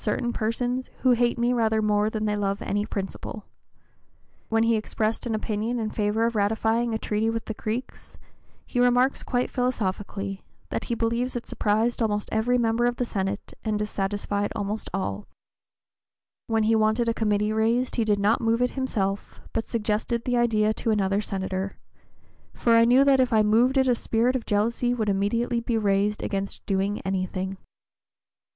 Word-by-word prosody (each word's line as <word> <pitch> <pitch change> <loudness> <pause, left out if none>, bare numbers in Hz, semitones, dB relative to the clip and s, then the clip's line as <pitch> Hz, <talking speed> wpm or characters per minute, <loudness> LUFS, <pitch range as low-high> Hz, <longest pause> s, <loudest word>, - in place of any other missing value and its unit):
033) 210 - +1
certain 240 0 -2
persons 245 +3 -1
"who 255 - +4
hate 240 0 +2
me 240 +1 +2
rather 220 -2 +2
more 210 0 +2
than 215 -1 -2
they 210 0 +1
love 200 -1 -1
any 205 +1 -1
principle;" 200 +1 -5 1.0
when 225 0 +3
he 230 0 +3
expressed 220 +2 -2
an 225 - 0
opinion 215 +2 -2
in 220 -2 -2
favor 215 +1 +1
of 230 0 -1
ratifying 225 +3 +1
a 220 - 0
treaty 220 0 0
with 225 -1 -3
the 220 - -4
Creeks, 220 +4 -5 0.5
he 245 - -3
remarks 245 +2 +3
quite 245 -1 -1
philosophically, 200 -5 -2 0.3
that - - -3
he 235 - -1
believes 235 +3 -1
it 240 - -4
"surprised 220 +3 0
almost 210 -2 0
every 235 +3 +2
member 235 0 +2
of 240 0 +1
the 245 - -1
Senate, 195 -2 -3
and 215 -1 0
dissatisfied 205 0 -2
almost 205 +2 -3
all;" 105 - -3 1.2
when 225 -1 +1
he 220 +1 +3
wanted 220 +2 +2
a 230 - +2
committee 210 -1 +1
raised 230 +3 +1
he 230 - +3
did 210 -2 +2
not 210 +4 +2
move 230 0 +2
it 250 - +1
himself, 205 -7 -2
but 225 - -2
suggested 225 +1 -1
the 245 - +1
idea 220 -3 +2
to 225 - -3
another 200 -1 +2
Senator, 190 -1 -3 0.8
for 235 - +2
"I 230 0 +6
knew 250 +3 +6
that 275 -1 +4
if 255 -1 +3
I 215 -1 +4
moved 235 +6 +3
it 265 0 +4
a 250 - +5
spirit 235 +2 +1
of 245 - -3
jealousy 235 +4 +1
would 220 -3 -1
immediately 230 +5 0
be 235 0 -1
raised 205 0 +1
against 195 -1 -3
doing 195 +1 0
anything." 190 0 -2
220 Hz, 175 wpm, -25 LUFS, 205-235 Hz, 1.2 s, I